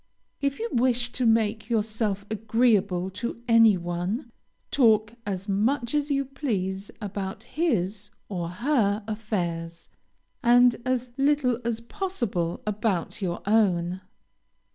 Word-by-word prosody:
If 280 0 0
you 460 - -2
wish 245 0 +1
to 250 -2 0
make 225 0 +2
yourself 215 -3 -1
agreeable 210 -4 +2
to 235 +5 -4
any 225 -3 +6
one, 180 - -3 0.4
talk 220 -4 +4
as 195 0 -3
much 235 +6 0
as 295 0 +1
you 275 -1 +1
please 205 -8 -3
about 200 -2 -5
his 205 - -1 0.2
or 175 -4 -3
her 210 - +1
affairs, 175 -7 -3 0.5
and 245 0 +6
as 255 -1 -1
little 275 -4 +2
as 230 -1 -1
possible 230 - -3
about 210 -3 -1
your 175 -2 -3
own. 185 -4 +2
220 Hz, 120 wpm, -26 LUFS, 190-245 Hz, 0.5 s, any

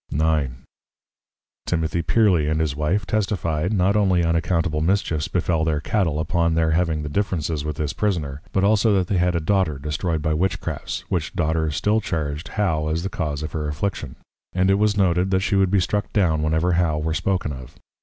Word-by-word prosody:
IX. 75 -4 +1 1.1
Timothy 85 0 0
Pearley 90 -5 +3
and 80 0 0
his 75 -3 0
Wife, 80 +7 0
testifyd, 90 -5 -1
Not 100 -1 +2
only 95 -4 +3
unaccountable 85 -1 0
Mischiefs 85 -3 0
befel 80 -3 0
their 80 -2 0
Cattle, 80 -3 0
upon 85 +1 +1
their 80 -1 +2
having 80 -2 0
of 75 - -6
Differences 85 -7 -1
with 75 0 -3
this 75 0 -2
Prisoner: 75 -9 -2
but 95 - +1
also 105 +1 +3
that 95 -2 +2
they 100 - +1
had 90 0 +2
a - - +2
Daughter 90 -3 +1
destroyed 75 +3 -2
by 80 - +1
Witchcrafts; 90 +5 -2
which - - -2
Daughter 80 0 0
still 105 +9 +1
charged 75 -4 -3
How 80 -8 -1
as 80 +2 -1
the 95 - -2
Cause 75 -4 -3
of 75 - -4
her 75 -2 -3
Affliction. 85 +7 -3 0.4
And 95 +1 +2
it 100 - +2
was 105 -1 +2
noted, 90 -1 +2
that 95 0 +2
she 100 +1 0
would 95 -1 +3
be 100 +1 +3
struck 105 +3 -1
down 85 -7 +2
whenever 80 +3 +1
How 85 -3 +1
were 80 +1 -1
spoken 90 -3 -1
of. 65 -2 -10
85 Hz, 195 wpm, -22 LUFS, 75-95 Hz, 1.1 s, Pearley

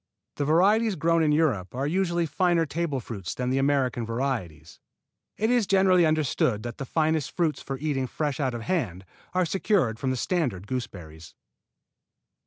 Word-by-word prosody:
The 145 - 0
varieties 200 +8 +3
grown 165 +1 +2
in 155 -1 +3
Europe 135 - +1
are 135 +2 -1
usually 175 +1 0
finer 170 +2 +1
table 155 -2 -2
fruits 105 -7 -6
than 125 0 -2
the 135 - +1
American 135 -3 +1
varieties. 115 - -4 0.6
It 220 +3 +1
is 240 -5 +2
generally 185 -3 +4
understood 140 -8 +1
that 120 +3 -7
the 135 - -4
finest 160 -1 0
fruits 165 -4 0
for 135 - -5
eating 135 -2 -1
fresh 145 +2 -3
out 130 -4 -1
of 115 - -5
hand 115 - -2 0.3
are 185 -1 +3
secured 170 - +1
from 130 - -1
the 130 - -1
standard 125 - -1
gooseberries. 90 -10 -7
145 Hz, 165 wpm, -26 LUFS, 120-170 Hz, 0.6 s, generally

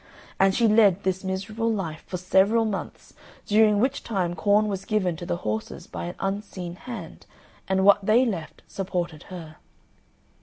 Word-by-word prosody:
And 195 0 +4
she 235 - +4
led 210 -3 +4
this 190 0 -1
miserable 210 +5 -2
life 165 -7 -4
for 180 - -4
several 195 +5 +3
months, 205 -3 -5 0.3
during 210 0 +4
which 260 +5 +1
time 185 -6 -1
corn 205 +4 +3
was 195 -2 -3
given 195 -5 0
to 175 - -7
the 175 - -1
horses 110 0 -3
by 85 -1 -6
an 85 - -6
unseen 195 -3 -4
hand, 195 -6 -9 0.4
and 190 0 +2
what 200 0 +6
they 225 +6 +4
left 175 -9 -5
supported 175 -5 -3
her. 165 -4 -9
195 Hz, 160 wpm, -25 LUFS, 175-215 Hz, 0.4 s, what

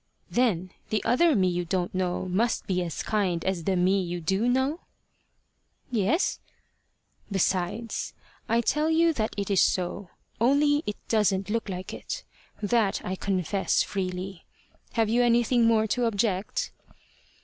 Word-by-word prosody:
"Then 190 -8 +1 0.2
the 215 -2 0
other 315 +6 +4
me 190 -3 +3
you 175 0 0
don't 175 +1 -2
know 185 0 -1
must 220 +6 0
be 180 -2 0
as 170 -3 -3
kind 185 -6 0
as 185 -3 -1
the 195 - +1
me 185 +2 +3
you 175 -1 -3
do 190 +7 0
know?" 265 +6 +1 1.1
"Yes." 245 - +1 0.9
"Besides, 195 +3 -1 0.3
I 230 +1 +3
tell 300 +6 +1
you 330 +1 +4
that 220 -6 -2
it 200 0 -2
is 195 - +4
so, 185 +1 0 0.3
only 290 +5 +3
it 210 - -2
doesn't 205 -3 +1
look 225 -2 -1
like 185 0 -5
it. - - -5 0.4
That 210 -1 +2
I 185 - -2
confess 190 0 0
freely. 185 -1 -4 0.5
Have 225 -2 +2
you 235 +3 +2
anything 240 0 +3
more 220 -1 +4
to 245 +2 +1
object?" 205 -3 -1
200 Hz, 145 wpm, -27 LUFS, 185-235 Hz, 1.1 s, other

